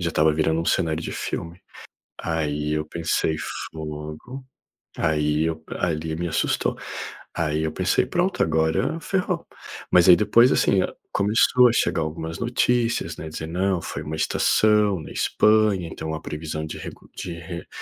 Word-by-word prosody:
Já 85 -1 0
estava 80 0 +3
virando 80 +1 +1
um - - -3
cenário 80 -3 +1
de - - -4
filme. 85 +2 -5 0.6
Aí 75 -2 -1
eu 75 0 0
pensei: 80 -1 -1 0.3
"Fogo." 75 - -7 0.6
Aí 75 0 +1
e 80 - -1
p 80 - -10
ali 80 -2 -1
me 85 0 -2
assustou. - - 0 0.6
Aí 80 -1 0
eu 80 - -2
pensei: - - +1
"Pronto, - - 0
agora 80 - +1
ferrou." 180 -2 -1 0.5
Mas 90 0 +5
aí 90 - +11
depois, 115 +5 +5
assim, 95 -2 +3
hã, - - 0 0.2
começou 115 +5 +4
a - - +1
chegar 85 -7 +1
algumas 80 +1 -4
notícias, 120 -6 +1
né. - - -7
A - - -4
dizer: 80 +1 -6
"Não 90 +1 0
foi 75 - -5
uma 75 +1 -5
estação 105 +1 +3
na 75 - -9
Espanha. 105 -5 +3
Então, 80 0 -5
a 80 - -5
previsão 75 0 -5
de - - -7
recu - - -10
de 90 - -5
re 85 +1 -7
80 Hz, 165 wpm, -24 LUFS, 80-100 Hz, 0.6 s, aí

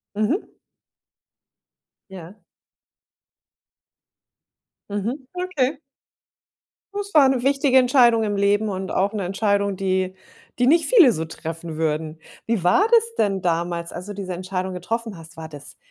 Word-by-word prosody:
Mhm. 215 - -1 1.6
Ja. 190 +2 -11 2.5
Mhm, 205 +7 -3 0.2
okay. 310 -6 -1 1.1
Das 405 0 -5
war 280 -4 +6
'ne 255 -2 0
wichtige 275 -1 +3
Entscheidung 245 -3 +5
im 205 -1 -1
Leben 205 +2 +2
und 190 -1 -4
auch 200 +3 0
'ne 205 -2 -2
Entscheidung, 200 +1 0
die 185 0 -1 0.4
die 245 - +2
nicht 325 +4 +4
viele 335 - +7
so 160 - -3
treffen 165 0 -7
würden. 155 0 -2 0.3
Wie 225 -6 -1
war 275 - +4
das 460 0 +3
denn 195 -2 +1
damals, 170 0 -2
als 180 +2 -7
du 205 - -6
diese 190 -2 -5
Entscheidung 185 +1 -4
getroffen 225 +2 -4
hast? 165 0 -14
War 160 -1 -7
das 145 -2 -13
200 Hz, 130 wpm, -22 LUFS, 180-250 Hz, 2.5 s, viele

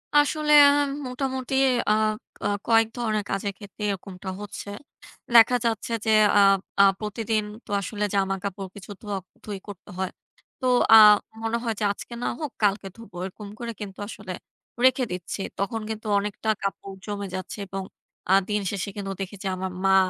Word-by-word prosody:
আসলে 300 +1 +3 0.2
আম 285 0 +2 0.2
মোটামুটি 260 0 -3 0.3
আ - - +5 0.5
ক - - -2 0.2
কয়েক 225 -1 +5
ধরনের 215 -3 0
কাজের 195 0 -1
ক্ষেত্রে 205 0 -10
এরকমটা 190 -1 -5
হচ্ছে। 205 0 -7 0.7
দেখা 235 +2 +8
যাচ্ছে 230 0 -1
যে 220 - +3 0.3
আ - - +7 0.4
আ - - +9 0.2
প্রতিদিন 215 0 -1 0.2
তো 205 - -10
আসলে 210 +2 -3
জামাকাপড় 195 0 -1
কিছু 205 +1 -10
ধোয়াক 200 -4 -4 0.2
ধুয়ি 205 -2 -5
করতে 200 -3 -10
হয়। 190 -1 -2 0.5
তো 260 - -4 0.3
আ - - +12 0.5
মনে 225 +1 0
হয় 225 -1 0
যে - - -2
আজকে 235 - -8
না - - 0
হোক 300 -4 -4
কালকে 200 -1 +2
ধোবো। 230 -6 -12
এরকম 200 +2 -8
করে 235 -1 -4
কিন্তু 195 -1 -7
আসলে 200 -4 -7 0.5
রেখে 260 0 +4
দিচ্ছি। 180 +2 -4 0.2
তখন 210 +3 -1
কিন্তু 220 0 -5
অনেকটা 210 +2 -2
কাপড় 195 0 -4
জমে 200 -1 -4
যাচ্ছে 185 +3 -6
এবং 195 0 -4 0.5
আ - - +7 0.2
দিন 210 0 +1
শেষে 200 0 -3
কিন্তু 195 -1 -4
দেখি 195 +2 -5
যে - - -2
আমার 185 0 -4
মা 195 0 +5
205 Hz, 165 wpm, -25 LUFS, 195-225 Hz, 0.7 s, আ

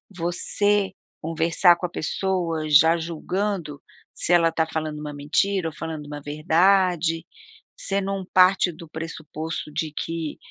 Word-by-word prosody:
você 190 +3 +1 0.3
conversar 165 +2 +3
com 180 - -3
a - - -18
pessoa, 170 -2 -2
já 160 +3 +6
julgando, 170 -1 -3 0.3
se - - -1
ela 165 -1 +5
tá 160 0 0
falando 155 -1 -4
uma 150 -1 -6
mentira 165 +6 0
ou - - -13
falando 160 -2 -6
uma 145 0 -7
verdade, 165 +2 +2 0.5
você 200 0 -1
não 195 0 -3
parte 185 0 +5
do 165 +1 -12
pressuposto 160 -1 -6
de 155 0 -3
que, 165 -2 -4
165 Hz, 135 wpm, -24 LUFS, 155-185 Hz, 0.5 s, já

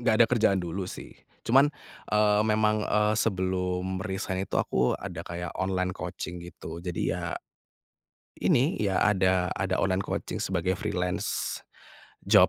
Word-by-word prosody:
nggak 120 -2 +3
ada 115 - +8
kerjaan 105 -6 +3
dulu, 90 +2 -3
sih. - - -8 0.3
Cuman, 135 +4 +6 0.5
eee, 105 0 +4
memang, 110 0 +2
eee, 105 0 +2
sebelum 95 -2 0
resign 95 -1 -2
itu - - -2
aku 65 -1 +2
ada - - -6
kayak 85 0 -5
online 95 -1 0
coaching 90 -1 -5
gitu. 85 -1 -8
Jadi 90 -1 -2
ya - - -3 1.1
ini, 135 +8 +3
ya, 95 -3 +2
ada 95 -3 +3
ada 95 -1 -1
online 95 0 +1
coaching - - -3
sebagai 95 - 0
freelance 90 -2 -2 0.7
job. - - +7
95 Hz, 140 wpm, -28 LUFS, 90-105 Hz, 1.1 s, ada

